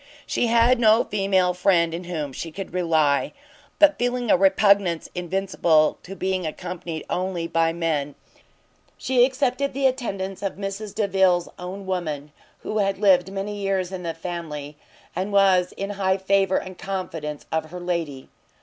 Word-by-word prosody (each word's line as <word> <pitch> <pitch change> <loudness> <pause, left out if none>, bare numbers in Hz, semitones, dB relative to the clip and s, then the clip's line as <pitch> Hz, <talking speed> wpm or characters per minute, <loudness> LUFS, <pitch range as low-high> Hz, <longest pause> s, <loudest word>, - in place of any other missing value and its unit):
She 240 - 0
had 235 +2 +4
no 220 0 +5
female 195 -3 +1
friend 175 -2 +2
in 175 +2 -5
whom 155 -6 -4
she 165 +5 -6
could 195 +3 -7
rely; 160 -5 +1 0.4
but 300 -1 +5
feeling 245 -1 0
a - - +7
repugnance 195 -2 +3
invincible 175 -3 +1
to 195 - -9
being 190 -1 -1
accompanied 170 0 -5
only 180 -2 -2
by 165 0 +1
men, 155 -4 -2 0.8
she 255 -2 +3
accepted 270 +1 0
the 275 0 0
attendance 200 -8 -1
of 195 -1 -3
Mrs 200 +1 -5
Delvile's 190 -4 +2
own 185 +2 -7
woman, 155 -6 -3 0.3
who 215 - -2
had 195 -1 +1
lived 190 -2 +4
many 200 +1 -4
years 195 -2 -1
in 185 -1 -5
the 165 -2 -4
family, 160 -4 -6 0.4
and 190 +4 -2
was 190 -3 +4
high - - -2 0.3
in - - -1
the 190 - -20
favour 195 -1 +3
and 185 -1 -6
confidence 165 -6 -5
of 160 0 0
her 180 +2 -7
lady. 170 -7 -3
185 Hz, 160 wpm, -24 LUFS, 170-200 Hz, 0.8 s, a